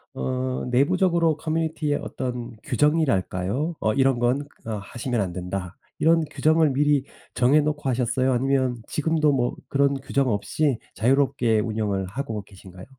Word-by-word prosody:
어 130 0 -2
내부적으로 165 +4 +2
커뮤니티의 155 -2 -1
어떤 120 -2 -5
규정이랄까요? 145 - 0
어 110 - +1
'이런 135 +1 +3
건 130 +4 +1 0.2
어 115 - -4
하시면 120 +3 -3
안 95 -3 -2
된다.' 90 +1 -5 0.2
이런 165 0 +4
규정을 155 -1 +3
미리 145 0 +2 0.3
정해 130 +5 +4
놓고 150 -1 -2
하셨어요? 130 +1 +1
아니면 130 -1 +1
지금도 155 0 +1
뭐 125 -3 0
그런 140 0 +2
규정 135 0 0
없이 120 +5 0 0.2
자유롭게 120 -2 +2
운영을 105 -3 -1
하고 110 0 -4
계신가요? 95 -1 -13
130 Hz, 330 characters per minute, -24 LUFS, 115-150 Hz, 0.3 s, 이런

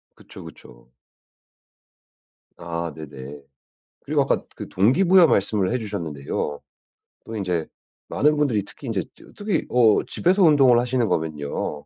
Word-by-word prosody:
그쵸, - - -13
그쵸. - - -15 1.7
아 85 -1 -5
네네. 70 -2 -10 0.6
그리고 - - 0
아까 - - 0
그 - - -8
동기부여 170 - +4
말씀을 100 -3 +1
해 125 - 0
주셨는데요. 80 - -4 0.7
또 110 - -7
인제 90 -5 -2 0.4
많은 150 +1 +2
분들이 125 -9 0
특히 135 - -10
인제 100 -5 -1
저 - - -18
특히 205 -5 -2
어 115 -4 +4
집에서 185 +2 +1
운동을 135 -7 +5
하시는 120 -2 0
거면요. 75 -2 -3
105 Hz, 275 characters per minute, -23 LUFS, 80-135 Hz, 1.7 s, 운동을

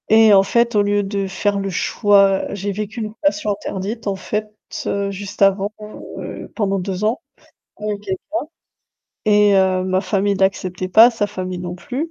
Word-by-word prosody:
Et 220 -1 +7
en 195 -1 +7
fait, 235 +3 +1
au 205 - +5
lieu 205 0 +1
de 195 0 -2
faire 200 +1 -1
le 195 0 -2
choix, 195 +1 +3
j'ai 200 0 -3
vécu 215 +3 -5
une 215 -1 -5
passion 295 -3 0
interdite, 205 +3 -5
en 200 - 0
fait, 210 +3 -3 0.4
heu, 200 0 -1
juste 200 +1 -8
avant, 195 +1 +3 0.5
heu, - - -8
pendant 195 -3 0
2 185 +1 -4
ans 220 +3 0 0.6
avec 210 -1 -4
quelqu'un 190 -3 -4 1.1
et 210 -1 +4
heu, 185 -1 +2
ma 185 0 +1
famille 200 +1 0
l'acceptait 185 -1 -1
pas, 225 +6 +7
sa 225 -3 -1
famille 185 -3 -5
non 175 0 -5
plus. 270 - -4
200 Hz, 175 wpm, -19 LUFS, 190-210 Hz, 1.1 s, Et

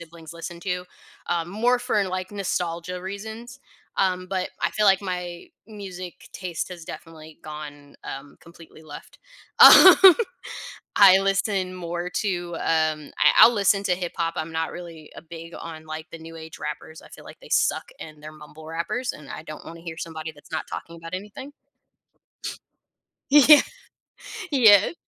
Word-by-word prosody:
siblings 165 -1 -12
listened 170 +1 -9
to, 180 -2 -3 0.4
um, 170 0 -2
more 240 +5 +2
for 245 -4 0
like 185 0 -4
nostalgia 180 -2 -3
reasons. 220 +7 -8 0.4
Um, 185 -1 0
but 185 -1 -2
I - - +1
feel 210 -1 +1
like 195 0 +4
my 180 -2 -5 0.2
music 185 -5 -9
taste 180 -3 -5
has 175 -3 -9
definitely 160 -1 -11
gone, 145 -2 -10
um, 135 +1 -9
completely 165 -1 -16
left, 150 -2 -12 0.4
um. 375 0 +10 0.9
I 190 -1 +9
listen 195 -1 0
more 175 0 -5
to, 175 -4 -3
um, 155 -2 -1
I - - +6
I'll 240 - +9
listen 200 -1 +2
to 180 - +2
hip 175 -1 -4
hop, 165 0 -1
I'm 160 +1 -4
not 160 0 -3
really, 165 -3 -10
uh, - - -8
big 165 0 -9
on 160 -1 -9
like 155 +1 -7
the 165 - -9
new 165 0 -11
age 160 -1 -10
rappers, 150 +1 -7
I - - -15
feel - - -14
like - - -13
they - - -14
suck - - +2 0.2
and 155 -1 -10
they're 155 +1 -10
mumble 155 +1 -14
rappers, 170 +10 -3
and 150 -2 -13
I - - -7
don't 155 -1 -10
wanna 165 0 -10
hear 165 -1 -8
somebody 160 -1 -6
that's 145 -1 -20
not 160 - -3
talking 170 - -8
about 165 +1 -8
anything. 210 +9 -8 1.8
Y 295 - +8
yeah. 300 -1 +9 0.9
Yeah. 220 - +6
175 Hz, 165 wpm, -24 LUFS, 160-195 Hz, 1.8 s, um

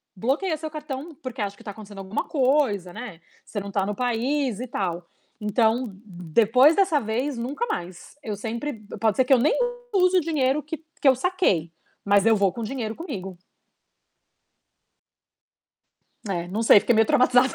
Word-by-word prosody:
bloqueia 285 - 0
seu 315 +1 -5
cartão, 300 0 -7
porque 255 -2 -5
acha 200 -1 -3
que - - -17
tá 205 - -6
acontecendo 205 -1 -11
alguma 195 +2 -3
coisa, 260 - +1
né, 185 -8 -8 0.2
você 210 - -5
não 200 0 -7
tá 195 -1 0
no 210 +1 -3
país 250 +1 -1
e 250 - -4
tal. 175 -6 -3 0.3
Então, 220 +3 +1
depois 215 - +3
dessa 375 -7 +3
vez, 245 +4 -2
nunca 265 - -3
mais, 175 - -6
eu 215 -2 -4
sempre 235 +8 -4 0.3
pode 220 -3 +2
ser 260 - +5
que 270 - +4
eu 260 - +5
nem 285 +6 +2 0.4
use 365 -1 +4
o - - +4
dinheiro 295 -3 +1
que 305 +2 -6 0.2
que 290 - +3
eu 265 - +7
saquei, 255 - 0 0.3
mas 200 0 +4
eu 225 -1 +5
vou 200 -2 +2
com 235 - -6
dinheiro 225 -1 -3
comigo. 195 - -7 2.9
É, 175 -3 -2
não 210 +5 -2
sei, 215 -2 +7
fiquei 240 - +2
meio 220 0 +4
traumatizada. 250 +1 +4
235 Hz, 170 wpm, -24 LUFS, 200-280 Hz, 2.9 s, eu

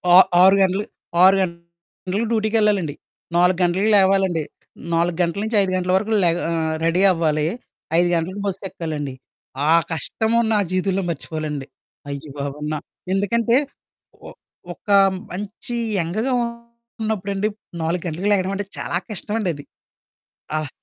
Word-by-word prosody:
ఆ - - +11 0.2
ఆరు 190 +1 +7
గంటలు 190 +2 +2 0.4
6 190 +1 +7
గంటల‌కి 170 +3 -5
డ్యూటీకెళ్ళాలండి. 210 -7 +1 0.4
4 180 +1 +4
గంటలకి 185 +5 +2
లేవాలండి. 190 -4 +3 0.5
4 170 0 +1
గంటల 175 +3 0
నుంచి, 220 0 0
5 190 -1 0
గంటల 185 0 0
వరకు 210 +3 0
లేగా 170 +1 +2
ఆహ్, 160 -1 0
రెడీ 165 +3 +2
అవ్వాలి. 155 -3 +1 0.5
5 175 - +3
గంటలకు 185 +5 -2
బస్సెక్కాలండి. 165 -7 -4 0.6
ఆ - - +7 0.2
కష్టము 220 - 0
నా - - +3
జీవితంలో 185 +1 0
మర్చిపోలెనండి. 155 -3 -4 0.4
అయ్య 140 +1 -6
బాబోయి! 145 +1 -4
న - - -1 0.4
ఎందుకంటే, 230 +4 +2 0.7
ఒ - - -7 0.4
ఒక - - -18 0.4
మంచి 205 +5 -5 0.3
యంగ్‌‌గా 215 +10 -1 0.7
ఉన్నప్పుడండి, 205 -1 -1 0.3
4 165 +2 -1
గంటలకి 175 +6 -2
లేగడం 190 -1 0
అంటే 205 +1 -3
చాలా - - -2
కష్టం 210 0 -4
అండది. 170 -9 -2 0.9
ఆహ్ 155 -2 -3
185 Hz, 125 wpm, -21 LUFS, 165-200 Hz, 0.9 s, ఆ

